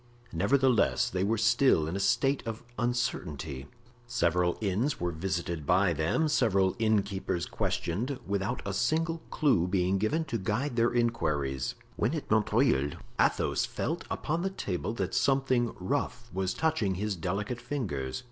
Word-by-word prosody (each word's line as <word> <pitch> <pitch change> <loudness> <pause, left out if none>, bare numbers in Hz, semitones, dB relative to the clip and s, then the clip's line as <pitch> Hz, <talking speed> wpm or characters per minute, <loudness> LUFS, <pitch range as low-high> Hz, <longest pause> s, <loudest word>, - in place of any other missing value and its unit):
Nevertheless, 130 -4 +3
they 95 +1 0
were 110 +3 +1
still 115 - +4
in 85 - -3
a - - -1
state 125 +7 +2
of 115 +1 -5 0.2
uncertainty. 80 - -2 0.4
Several 90 -6 +1
inns 110 +7 0
were 85 0 -1
visited 85 -1 -3
by 90 0 +4
them, 80 - +1
several 100 -10 +2
innkeepers 100 -5 0
questioned, 120 +11 -2
without 100 0 -2
a 100 - -2
single 160 +9 0
clew 120 - +2
being 95 +1 +1
given 155 +11 0
to 120 -6 -2
guide 115 +8 -1
their 120 0 +3
inquiries, 75 - 0 0.2
when 115 +10 +1
at 150 - -5
Montreuil 110 - +3 0.3
Athos - - +2
felt - - -3
upon 165 +3 -2
the 195 - 0
table 105 - -3
that 95 -4 -2
something 130 -3 +2
rough 90 - -2
was 95 0 -1
touching 155 -12 +1
his 105 +1 -2
delicate 100 +8 -3
fingers. 90 - -3
105 Hz, 145 wpm, -29 LUFS, 90-125 Hz, 0.4 s, still